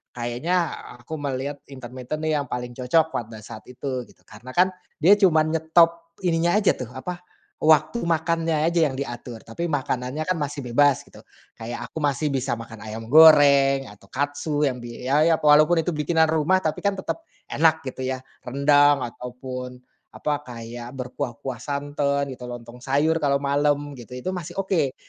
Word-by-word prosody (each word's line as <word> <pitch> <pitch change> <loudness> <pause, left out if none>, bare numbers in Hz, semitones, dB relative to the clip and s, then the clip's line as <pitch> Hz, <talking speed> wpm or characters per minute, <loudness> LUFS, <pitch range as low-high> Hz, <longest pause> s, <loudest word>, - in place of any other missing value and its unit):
kayaknya 120 +9 -2 0.5
aku 125 - -9
melihat 140 0 -3
intermiten 130 +2 -7
yang 150 -2 0
paling 125 0 -4
cocok 130 +6 +1
pada 110 -2 -5
saat 110 +1 -11
itu 125 -1 -5
gitu - - -23
karena 120 +5 -12
kan 185 +1 +4 0.2
dia 170 +6 +4
cuman 160 -5 +4
nyetop 165 +1 +2
ininya 170 0 +2
aja 210 -2 +4
tuh 125 - -6
apa, 175 +7 -5 0.4
waktu 155 +9 +3
makannya 165 -3 0
aja 170 +1 +2
yang 135 - -5
diatur 120 -3 -6
tapi 170 +10 -4
makanannya 135 -1 -2
kan 185 0 -1
masih 145 -1 -4
bebas 135 +3 +3
gitu - - -17 0.4
kayak 115 +1 -5
aku - - -5
masih 145 0 0
bisa 130 -2 -1
makan 115 -1 -10
ayam 110 +2 -7
goreng 140 -4 +7
atau 100 -1 -18
katsu 145 +4 -2
yang 130 -3 0
di 120 +1 -9
ya 135 +4 +2
ya 165 - +5
walaupun 155 +2 +5
itu 175 - -1
bikinan 160 +1 +2
rumah 165 +4 +2
tapi 155 - -1
kan 200 -1 0
tetep, 190 - -4 0.3
enak 160 +1 +3
gitu 130 -1 -5
ya 130 0 -3 0.2
rendang 145 +1 +4
ataupun, 125 +1 -7 0.3
apa 150 -1 -1
kayak 120 +1 -8
berkuah-kuah 125 -1 -5
santan 140 -1 -2
gitu 125 -1 -8
lontong 120 0 -9
sayur 145 +5 +1
kalau 140 -3 +2
malem 145 +1 +1
gitu 120 +1 -10
itu 125 +9 -4
masih 180 -4 -6
oke, 160 -9 0
140 Hz, 165 wpm, -24 LUFS, 125-160 Hz, 0.5 s, goreng